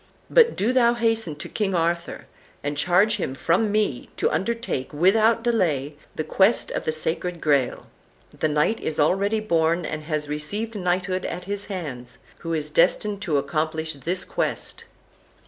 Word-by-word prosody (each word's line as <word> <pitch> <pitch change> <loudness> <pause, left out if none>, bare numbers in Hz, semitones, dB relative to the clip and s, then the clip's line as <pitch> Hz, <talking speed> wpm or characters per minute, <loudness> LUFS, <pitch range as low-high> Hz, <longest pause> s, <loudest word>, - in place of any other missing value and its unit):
But 475 -1 +5
do 225 +6 +1
thou 240 -2 +4
hasten 225 -8 0
to 150 - -8
King 195 -3 -1
Arthur, 170 0 -1 0.4
and 145 +1 -2
charge 185 +8 +3
him 135 -8 -3
from 185 +9 +1
me 210 - 0
to - - +1
undertake, 230 - -2
without 215 +8 +3
delay, 160 - +1 0.2
the 155 - -2
quest 195 +8 +2
of - - -3
the 155 - +1
Sacred 165 +3 -2
Graal. 140 -5 +1 0.5
The - - -1
knight 150 +9 +1
is 155 - -3
already 200 +8 +2
born, 170 -3 +1
and 155 -1 -5
has 155 -2 -2
received 205 +10 -3
knighthood 185 -1 -1
at 180 - -4
his 200 +2 -4
hands, 140 - -6 0.2
who 165 - -5
is 150 -2 -2
destined 195 +5 +2
to 165 -7 0
accomplish 160 +3 -1
this 170 +6 -3
quest." - - -3
175 Hz, 160 wpm, -24 LUFS, 155-210 Hz, 0.5 s, But